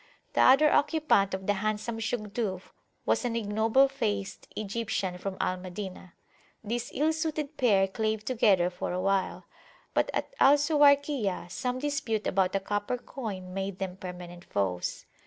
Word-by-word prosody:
The -, -, +3 dB
other 275 Hz, +4 st, +6 dB
occupant 290 Hz, -11 st, +3 dB
of 190 Hz, 0 st, -7 dB
the 205 Hz, -, +2 dB
handsome 215 Hz, +3 st, -2 dB
Shugduf 215 Hz, -4 st, -3 dB, 0.3 s
was -, -, +2 dB
an 240 Hz, -2 st, -1 dB
ignoble 225 Hz, +4 st, +3 dB
faced 210 Hz, -7 st, -3 dB
Egyptian 200 Hz, -3 st, -2 dB
from 190 Hz, +1 st, -4 dB
Al 185 Hz, -, 0 dB
Madinah. 185 Hz, 0 st, -8 dB, 0.5 s
This 235 Hz, +3 st, -3 dB
ill 310 Hz, +3 st, +1 dB
suited 310 Hz, -2 st, -3 dB
pair 200 Hz, -8 st, +3 dB
clave 215 Hz, +2 st, -2 dB
together 200 Hz, -8 st, +3 dB
for 180 Hz, -, -4 dB
awhile, 190 Hz, +1 st, 0 dB, 0.5 s
but -, -, +2 dB
at -, -, -3 dB
Al 275 Hz, +2 st, +7 dB
Suwayrkiyah 285 Hz, -, +2 dB
some 250 Hz, +4 st, -2 dB
dispute 255 Hz, -6 st, -2 dB
about 190 Hz, 0 st, +1 dB
a -, -, +3 dB
copper 205 Hz, +5 st, -2 dB
coin 200 Hz, -8 st, -7 dB
made 195 Hz, 0 st, -3 dB
them 190 Hz, -2 st, -4 dB
permanent 180 Hz, -2 st, -8 dB
foes. 90 Hz, -3 st, -2 dB
210 Hz, 145 wpm, -29 LUFS, 190-255 Hz, 0.5 s, Al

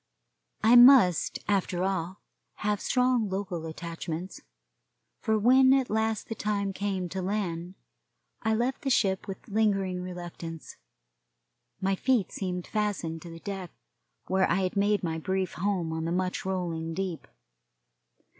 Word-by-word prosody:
I 230 Hz, +2 st, +6 dB
must, 245 Hz, -, +7 dB
after 190 Hz, -3 st, 0 dB
all, 190 Hz, -1 st, -2 dB, 0.4 s
have 210 Hz, -1 st, +1 dB
strong 250 Hz, -4 st, +2 dB
local 190 Hz, -4 st, -3 dB
attachments, 165 Hz, +2 st, -6 dB, 0.8 s
for 220 Hz, 0 st, +1 dB
when 260 Hz, +4 st, +6 dB
at 265 Hz, -4 st, +1 dB
last 220 Hz, 0 st, 0 dB
the -, -, -3 dB
time 200 Hz, -2 st, -2 dB
came 190 Hz, -2 st, -2 dB
to 190 Hz, +2 st, -4 dB
land 180 Hz, -2 st, -3 dB, 0.7 s
I 220 Hz, 0 st, +1 dB
left 245 Hz, +3 st, -1 dB
the 275 Hz, -, -1 dB
ship 195 Hz, -6 st, +1 dB
with 195 Hz, +4 st, -8 dB
lingering 195 Hz, -4 st, +1 dB
reluctance. 175 Hz, -2 st, -7 dB, 1.1 s
My 195 Hz, +1 st, +1 dB
feet 235 Hz, 0 st, +1 dB
seemed 180 Hz, -2 st, -4 dB
fastened 200 Hz, -7 st, -2 dB
to 170 Hz, -, -9 dB
the 165 Hz, 0 st, -10 dB
deck 195 Hz, -3 st, -5 dB, 0.6 s
where 190 Hz, 0 st, +2 dB
I 190 Hz, +3 st, +2 dB
had 185 Hz, -, -2 dB
made 205 Hz, 0 st, +2 dB
my 160 Hz, -1 st, -2 dB
brief 190 Hz, +2 st, -2 dB
home 175 Hz, -2 st, -1 dB
on 160 Hz, 0 st, -3 dB
the 165 Hz, -, -2 dB
much 185 Hz, +1 st, -1 dB
rolling 170 Hz, -4 st, -2 dB
deep. 185 Hz, -3 st, -4 dB
190 Hz, 140 wpm, -28 LUFS, 175-210 Hz, 1.1 s, must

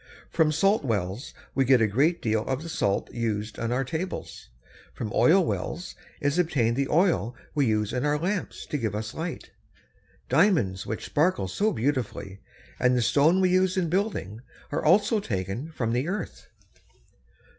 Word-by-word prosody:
From 160 Hz, -2 st, +3 dB
salt 195 Hz, +6 st, +2 dB
wells 105 Hz, -1 st, -2 dB, 0.2 s
we 135 Hz, -, +2 dB
get 130 Hz, -1 st, +5 dB
a 115 Hz, -, +4 dB
great 140 Hz, -, +1 dB
deal 110 Hz, -1 st, +1 dB
of 135 Hz, +3 st, -2 dB
the 165 Hz, -, -7 dB
salt 100 Hz, -11 st, -1 dB
used 110 Hz, -2 st, -3 dB
on 115 Hz, 0 st, -2 dB
our 125 Hz, +2 st, +1 dB
tables. 160 Hz, +7 st, -5 dB, 0.5 s
From 110 Hz, -, -4 dB
oil 180 Hz, +2 st, +5 dB
wells 175 Hz, +2 st, -4 dB, 0.3 s
is 145 Hz, +2 st, 0 dB
obtained 125 Hz, -9 st, +1 dB
the 135 Hz, +1 st, -1 dB
oil 155 Hz, -, +2 dB, 0.2 s
we 145 Hz, -4 st, +2 dB
use 110 Hz, 0 st, 0 dB
in 125 Hz, 0 st, -1 dB
our 150 Hz, 0 st, +2 dB
lamps 180 Hz, +4 st, -3 dB
to 150 Hz, -, -1 dB
give 110 Hz, -4 st, -2 dB
us 110 Hz, 0 st, -4 dB
light. 165 Hz, +1 st, -5 dB, 0.8 s
Diamonds 155 Hz, -, +2 dB
which 110 Hz, -, -4 dB
sparkle 150 Hz, -, +1 dB
so 205 Hz, -, 0 dB
beautifully, 110 Hz, -6 st, -2 dB, 0.4 s
and 125 Hz, 0 st, +3 dB
the -, -, +2 dB
stone 150 Hz, -, +4 dB
we 185 Hz, -1 st, +3 dB
use 185 Hz, 0 st, +2 dB
in 175 Hz, -3 st, +1 dB
building, 175 Hz, -, -2 dB, 0.3 s
are -, -, -1 dB
also 205 Hz, +7 st, +4 dB
taken 105 Hz, -, -4 dB
from 115 Hz, -7 st, -2 dB
the 125 Hz, +5 st, 0 dB
earth. 190 Hz, -1 st, -5 dB
135 Hz, 165 wpm, -26 LUFS, 110-170 Hz, 0.8 s, get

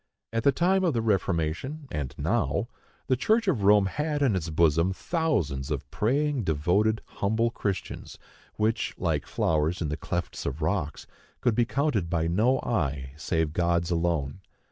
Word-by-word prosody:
At 115 Hz, -, +1 dB
the 140 Hz, -, +5 dB
time 185 Hz, +6 st, +2 dB
of 165 Hz, -7 st, +2 dB
the 115 Hz, -, +1 dB
Reformation, 100 Hz, -, -1 dB
and 70 Hz, -4 st, -4 dB
now, -, -, 0 dB, 0.4 s
the 130 Hz, -, +2 dB
Church 220 Hz, -, +2 dB
of 145 Hz, -, +2 dB
Rome 100 Hz, 0 st, +5 dB
had 150 Hz, +8 st, -1 dB
in 120 Hz, -8 st, +3 dB
its 85 Hz, -3 st, -2 dB
bosom 85 Hz, +3 st, +3 dB
thousands 95 Hz, -, -1 dB
of 70 Hz, -4 st, -3 dB
praying, 140 Hz, +3 st, +1 dB
devoted, 90 Hz, +7 st, +1 dB
humble 110 Hz, +3 st, 0 dB
Christians, 100 Hz, -5 st, -4 dB, 0.4 s
which, 110 Hz, +1 st, 0 dB
like -, -, -1 dB
flowers 80 Hz, +2 st, 0 dB
in 80 Hz, -, -2 dB
the 75 Hz, -, -2 dB
clefts 85 Hz, +2 st, -4 dB
of 70 Hz, +3 st, -3 dB
rocks, 80 Hz, -2 st, -1 dB, 0.3 s
could 120 Hz, -, +2 dB
be 120 Hz, +2 st, +2 dB
counted 120 Hz, -, 0 dB
by 85 Hz, -2 st, 0 dB
no 110 Hz, +10 st, +3 dB
eye, 70 Hz, -, -2 dB
save 80 Hz, 0 st, -1 dB
God's 85 Hz, 0 st, +1 dB
alone. 85 Hz, -3 st, 0 dB
95 Hz, 160 wpm, -27 LUFS, 80-125 Hz, 0.4 s, the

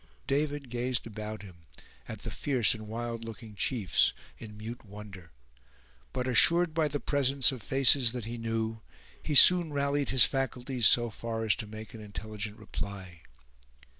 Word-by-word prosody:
David 145 Hz, -2 st, -2 dB
gazed 125 Hz, 0 st, -2 dB
about 110 Hz, -1 st, -7 dB
him, 85 Hz, -4 st, -15 dB, 0.4 s
at -, -, -8 dB
the -, -, -6 dB
fierce 125 Hz, -7 st, +2 dB
and 110 Hz, -1 st, -9 dB
wild 115 Hz, +1 st, -5 dB
looking 115 Hz, -1 st, -9 dB
chiefs, 100 Hz, -2 st, +1 dB, 0.3 s
in 105 Hz, -2 st, -10 dB
mute 115 Hz, +3 st, -8 dB
wonder; 100 Hz, -5 st, -11 dB, 0.8 s
but 125 Hz, -1 st, -3 dB
assured 165 Hz, +7 st, +4 dB
by 160 Hz, -1 st, +1 dB
the 145 Hz, 0 st, -3 dB
presence 140 Hz, -1 st, +2 dB
of 130 Hz, -3 st, -7 dB
faces 135 Hz, -2 st, +4 dB
that 125 Hz, -3 st, -5 dB
he 120 Hz, +1 st, -6 dB
knew, 115 Hz, -1 st, -3 dB, 0.4 s
he 150 Hz, -, -3 dB
soon 175 Hz, +2 st, +7 dB
rallied 140 Hz, -1 st, -1 dB
his 130 Hz, -3 st, +7 dB
faculties 130 Hz, -3 st, 0 dB
so 120 Hz, -1 st, +3 dB
far 115 Hz, 0 st, -4 dB
as 105 Hz, -, +3 dB
to 110 Hz, -, -5 dB
make 110 Hz, +1 st, -10 dB
an 110 Hz, -, -9 dB
intelligent 105 Hz, 0 st, -7 dB
reply. 100 Hz, -5 st, -7 dB
115 Hz, 160 wpm, -29 LUFS, 110-135 Hz, 0.8 s, soon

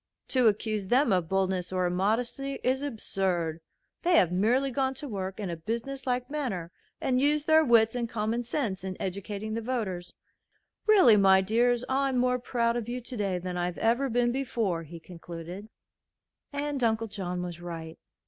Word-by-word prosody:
"To 255 Hz, -3 st, +4 dB
accuse 215 Hz, -1 st, 0 dB
them 250 Hz, 0 st, +3 dB
of 175 Hz, -3 st, 0 dB
boldness 190 Hz, -2 st, 0 dB
or 185 Hz, -1 st, 0 dB
immodesty 230 Hz, +9 st, -1 dB
is 260 Hz, +2 st, +1 dB
absurd. 190 Hz, -, -2 dB, 0.4 s
They 350 Hz, 0 st, +3 dB
have 175 Hz, -, +4 dB
merely 240 Hz, +9 st, +2 dB
gone 265 Hz, 0 st, 0 dB
to 290 Hz, +2 st, -6 dB
work 195 Hz, -4 st, -4 dB
in 195 Hz, -4 st, -3 dB
a -, -, -3 dB
business 235 Hz, +10 st, -4 dB
like 250 Hz, 0 st, 0 dB
manner 240 Hz, -, -3 dB, 0.3 s
and 255 Hz, -1 st, +1 dB
used 295 Hz, +1 st, +2 dB
their 315 Hz, 0 st, +6 dB
wits 230 Hz, -4 st, +5 dB
and 240 Hz, -2 st, -2 dB
common 225 Hz, +1 st, -1 dB
sense 230 Hz, -6 st, -2 dB
in 190 Hz, -1 st, -5 dB
educating 200 Hz, +3 st, -4 dB
the 230 Hz, -, -2 dB
voters. 200 Hz, -8 st, -3 dB, 0.7 s
Really, 375 Hz, -, +7 dB
my 190 Hz, -1 st, +6 dB
dears, 240 Hz, +4 st, +2 dB
I'm 270 Hz, 0 st, +1 dB
more 250 Hz, 0 st, +2 dB
proud 235 Hz, -1 st, 0 dB
of 240 Hz, -1 st, -3 dB
you 245 Hz, +1 st, -3 dB
today 210 Hz, -7 st, -2 dB
than 180 Hz, 0 st, -4 dB
I've 175 Hz, 0 st, -2 dB
ever 240 Hz, +5 st, +2 dB
been 240 Hz, 0 st, +2 dB
before," 230 Hz, -9 st, -1 dB
he 165 Hz, +1 st, -10 dB
concluded. 175 Hz, +4 st, -9 dB, 0.8 s
And 285 Hz, -2 st, -2 dB
Uncle 225 Hz, 0 st, +2 dB
John 180 Hz, -4 st, -4 dB
was 175 Hz, -1 st, -6 dB
right. 165 Hz, -2 st, -7 dB
220 Hz, 170 wpm, -28 LUFS, 185-250 Hz, 0.8 s, Really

